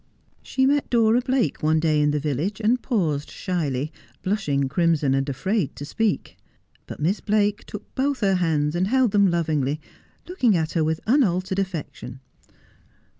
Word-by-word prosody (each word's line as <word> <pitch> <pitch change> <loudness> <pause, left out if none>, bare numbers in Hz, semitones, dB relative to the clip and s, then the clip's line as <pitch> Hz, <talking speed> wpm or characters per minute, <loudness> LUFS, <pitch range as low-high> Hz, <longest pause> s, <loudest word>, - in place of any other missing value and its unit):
She 265 - 0
met 285 +1 +1
Dora 230 0 +3
Blake 255 - 0
one 155 +1 +2
day 155 -2 +2
in 150 - +3
the 150 0 0
village, 155 - -2
and 230 +3 +2
paused 160 - -1
shyly, 150 -5 -2 0.3
blushing 150 -9 0
crimson, 155 -2 +1
and 135 +1 0
afraid 185 - -1
to 145 - -7
speak. 215 +7 -2 0.5
But - - -8
Miss 175 +8 0
Biake 210 -1 +1
took 210 - -10
both 270 -1 -1
her 195 -2 +3
hands, 155 -4 +1
and 180 +2 0
held 255 0 +2
them 200 -1 +4
lovingly, 155 -4 0 0.5
looking 255 - +2
at 160 0 -1
her 165 - +1
with 160 +1 -1
unaltered 195 -7 +2
affection. 160 -8 -5
175 Hz, 160 wpm, -23 LUFS, 150-215 Hz, 0.5 s, them